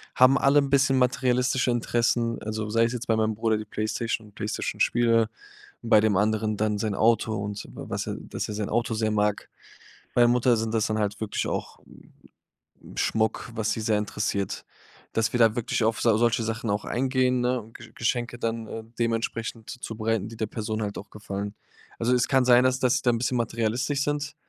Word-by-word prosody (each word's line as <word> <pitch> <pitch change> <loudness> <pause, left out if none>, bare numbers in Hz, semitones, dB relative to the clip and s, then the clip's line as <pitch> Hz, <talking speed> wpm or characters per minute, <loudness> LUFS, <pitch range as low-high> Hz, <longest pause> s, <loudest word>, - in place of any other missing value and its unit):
haben 130 +2 +6
alle 140 +1 +4
'n 140 - 0
bisschen 135 -1 +3
materialistische 125 0 +2
Interessen, 120 0 0
also, 110 0 -4
sei 115 +2 +3
es 120 - -2
jetzt 125 0 -5
bei 115 - +3
meinem 110 -1 +1
Bruder 110 0 +1
die 110 - -6
Playstation, 110 0 -3
Playstation 105 +1 -4
Spiele, 115 -2 +3 0.5
bei 115 -2 +5
dem 105 -3 +2
anderen 110 0 +1
dann 105 -1 0
sein 105 -2 -1
Auto 110 -1 +2
und 100 0 -4
was - - -4
er - - -3
dass - - -5
er 105 - -4
sein 105 -1 -3
Auto 115 0 0
sehr 110 -1 0
mag. 105 -1 0 0.7
Bei 120 - +5
der 120 - +6
Mutter 125 0 +3
sind 110 0 -2
das 110 -1 +2
dann 110 0 -1
halt 105 0 -2
wirklich 110 -1 -2
auch - - -4 1.2
Schmuck, 110 +1 0
was 110 -1 0
sie 110 - -3
sehr 110 -1 +1
interessiert, 105 -2 -2 0.5
dass 115 0 0
wir 120 - 0
da 115 -1 +5
wirklich 120 0 -1
auf 115 0 +1
sa 115 -3 +4
solche 115 +1 +2
Sachen 115 -1 -2
auch 105 - -1
eingehen, 130 0 +1
ne, 125 0 +1
und 110 +1 -15
Ge 110 -1 -13
Geschenke 120 0 -1
dann, 115 -1 -2
äh, 115 - -6 0.2
dementsprechend 115 -1 -2
zubereiten, 115 -3 -3
die 115 - -10
der 110 - -2
Person 110 0 -4
halt 100 -1 -3
auch 100 - -10
gefallen. 100 -1 -5 0.4
Also, 120 +2 +2
es 125 0 +2
kann 130 -2 +3
sein, 125 0 +6
dass 130 0 +2
das 130 0 +2
da 125 - +3
'n 115 - +1
bisschen 125 +1 0
materialistisch 120 +5 0
sind, 145 0 -2
115 Hz, 200 wpm, -26 LUFS, 110-125 Hz, 1.2 s, haben